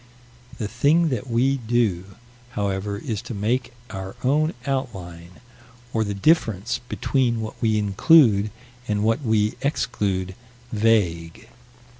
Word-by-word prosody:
The 110 - -3
thing 145 +9 +2
that 125 -1 -3
we 130 +4 +2
do, 110 -6 -1 0.4
however, 100 0 -2
is 105 0 -4
to 120 - -7
make 120 +5 -1 0.2
our 95 -1 -6
own 150 +5 +2
outline, 95 -11 -4 0.6
or 110 - +1
the 100 -1 -3
difference 115 - +1
between 125 -4 0
what 110 -1 -6
we 110 -2 +2
include 105 - +4 0.4
and 105 -1 0
what 115 +5 +1
we 110 -4 +1
exclude, 100 - -1 0.4
vague. 105 -4 0
110 Hz, 120 wpm, -23 LUFS, 100-125 Hz, 0.6 s, include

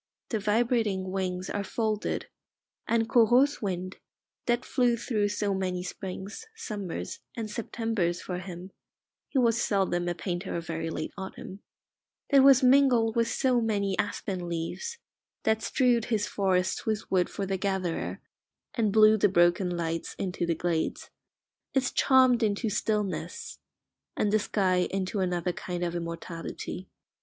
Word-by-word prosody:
The 220 - 0
vibrating 210 -3 +1
wings 185 -1 -2
are 205 - -2
folded, 215 +1 -1 0.6
and 230 -1 +2
Corot's 245 +5 +4
wind, 185 -2 -3 0.5
that 240 +1 +1
flew 245 -3 +2
through 215 -3 0
so 205 -1 -1
many 185 -2 -2
springs, 190 - -6
summers, 200 - -5 0.2
and 220 -2 -4
Septembers 220 -6 -1
for 180 -1 -4
him 180 0 -8 0.6
(he - - -2
was 235 -2 +3
seldom 180 -3 +1
a 175 - -2
painter 175 +2 -3
of 170 -1 -3
very 165 0 -3
late - - -4
autumn), 190 0 -7 0.7
that 275 -1 +7
was 270 -1 +7
mingled 250 -4 +5
with 230 0 +2
so 250 0 +2
many 200 -3 0
aspen 185 -3 -2
leaves, 170 - -4 0.5
that 220 0 +2
strewed 240 0 +2
his 215 -4 0
forests 185 -2 0
with 215 -1 -2
wood 185 -2 +2
for 200 - -3
the 195 0 -1
gatherer, 190 -3 -2 0.5
and 220 -4 +1
blew 215 +1 +6
the 205 - +4
broken 175 +1 +3
lights 165 -1 -3
into 180 -2 -2
the 170 - +1
glades, 165 -1 -2 0.6
is 260 -1 +2
charmed 255 -3 +5
into 215 0 0
stillness, 210 -1 -2 0.6
and 210 0 +1
the 215 - +5
sky 185 -3 +1
into 195 +1 -2
another 180 -1 0
kind 175 0 -4
of 170 -1 -1
immortality. 170 +2 -6
200 Hz, 145 wpm, -28 LUFS, 180-225 Hz, 0.7 s, that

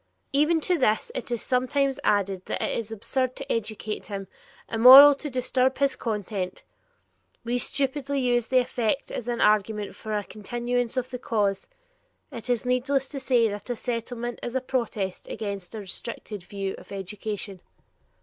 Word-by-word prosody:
'" - - -45
Even 325 +2 +3
to 355 +1 +1
this 215 -4 +1
it 255 - -5
is 240 -2 -2
sometimes 265 +1 +1
added 195 -2 +1
that - - -2
it - - -1
is 225 -1 -4
absurd 250 +4 -1
to - - -6
educate 215 -1 -3
him, 195 -2 -5 0.4
immoral 260 +6 +10
to 295 +2 -6
disturb 255 0 +1
his 275 -1 +2
content. 205 -4 -3 0.8
We 240 +1 -1
stupidly 280 +2 -1
use 245 -2 +1
the 260 - +2
effect 250 +1 0
as 240 - -5
an 240 -1 -1
argument 210 0 +2
for 215 -1 -3
a 205 - -2
continuance 240 +4 -3
of 255 0 -2
the 250 - -5
cause. 205 -5 0 0.6
It 230 +1 -7
is 245 0 +1
needless 260 +2 +1
to 275 - -5
say 250 -3 +3
that 205 +3 -7
a 245 - -1
Settlement 240 +1 -4
is 240 - -5
a 260 - +1
protest 220 -7 -3
against 200 -2 -5
a - - -4
restricted 205 +1 -5
view 195 +1 -4
of - - -16
education. 200 0 -5
235 Hz, 170 wpm, -26 LUFS, 210-255 Hz, 0.8 s, immoral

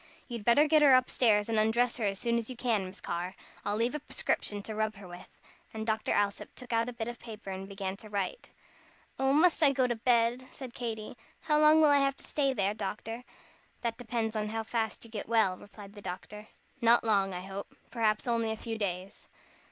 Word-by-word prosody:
"You'd 235 -4 -5
better 265 +7 +5
get 310 0 +5
her 280 -3 +8
up 255 0 +3
stairs 210 -4 +3
and 225 -1 +1
undress 235 +3 +2
her 225 - -1
as 195 -1 0
soon 235 +2 +1
as 230 - -5
you 255 - -5
can, 230 -5 0
Miss 185 +2 -9
Carr. 175 +2 -3 0.3
I'll 205 - -1
leave 230 +4 +1
a 300 - -2
prescription 205 -6 -2
to 220 - -5
rub 215 0 -1
her 195 -1 -11
with." 175 +1 -10 0.5
And 220 0 -3
Dr. 220 -1 0
Alsop 200 -1 0
took 250 -2 -8
out 230 +1 +2
a - - -6
bit 230 -1 -4
of 240 -1 -6
paper 215 -3 -8
and 190 +1 -6
began 195 -1 -4
to 215 - -12
write. 205 - -3 0.7
"Oh, 270 0 +3
must 325 +4 +4
I 290 -3 +6
go 265 -2 +2
to 240 -1 0
bed?" 235 +2 +2
said 260 -3 -8
Katy. 225 -1 -5 0.2
"How 300 0 +2
long 305 +1 +7
will 300 -2 +6
I 285 - +5
have 275 0 +2
to - - -12
stay 275 -2 0
there, 205 -5 0
doctor?" 225 +3 -5 0.6
"That 230 -1 -2
depends 225 -2 -2
on 210 0 -1
how 225 +1 -2
fast 220 0 -2
you 230 - -14
get 215 -1 -5
well," 220 -5 +3
replied 200 +1 -13
the 205 - -11
doctor; 205 +3 -7 0.3
"not 235 +1 +5
long, 200 -4 +2
I 180 -1 -4
hope. 195 +1 -7 0.2
Perhaps 215 -3 +1
only 230 -2 +1
a 220 - -1
few 225 0 -5
days. 185 -1 -4
225 Hz, 225 wpm, -30 LUFS, 205-245 Hz, 0.7 s, her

